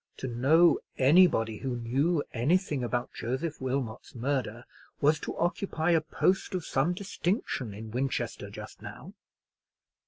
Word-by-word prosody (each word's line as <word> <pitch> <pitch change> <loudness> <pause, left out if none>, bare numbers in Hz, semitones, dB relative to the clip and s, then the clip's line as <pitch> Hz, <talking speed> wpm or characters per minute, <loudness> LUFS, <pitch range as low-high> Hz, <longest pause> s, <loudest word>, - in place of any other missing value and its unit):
To 130 - -4
know 145 +8 +4 0.2
anybody 130 -7 +4
who 130 -2 -3
knew 140 +7 +1
anything 145 - +1
about 120 0 -2
Joseph 130 +7 -3
Wilmot's 130 -4 -3
murder 125 -2 -2 0.3
was 150 +2 +3
to - - -5
occupy 175 -1 0
a 165 -2 +4
post 185 +4 0
of 180 - -3
some 150 +7 +1
distinction 180 - -2
in 110 +1 -8
Winchester 130 +3 -2
just - - -10
now. - - -9
135 Hz, 130 wpm, -29 LUFS, 120-170 Hz, 0.3 s, know